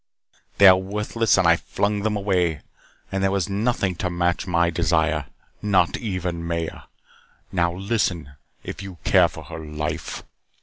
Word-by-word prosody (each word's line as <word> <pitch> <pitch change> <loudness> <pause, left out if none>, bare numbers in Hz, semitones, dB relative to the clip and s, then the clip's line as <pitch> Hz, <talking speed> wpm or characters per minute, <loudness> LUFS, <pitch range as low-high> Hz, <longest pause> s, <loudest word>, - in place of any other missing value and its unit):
They 100 - +6
were 95 - +4
worthless 105 +4 0
and 95 -2 +4
I 85 0 +5
flung 100 +3 -1
them 105 0 0
away. 90 -6 0 0.5
And 95 - -1
there 95 - +3
was 95 -2 0
nothing 100 -1 0
to 90 - -1
match 90 +1 0
my 85 -1 +2
desire. 80 -3 +1 0.3
Not 95 -4 +2
even 90 -6 -3
Maya. 85 -1 -4 0.7
Now, 85 -1 +1
listen, 95 - -1 0.3
if - - -7
you 95 -2 -8
care - - +5
for - - -10
her 80 - -8
life." 75 0 -4
90 Hz, 150 wpm, -23 LUFS, 85-100 Hz, 0.7 s, They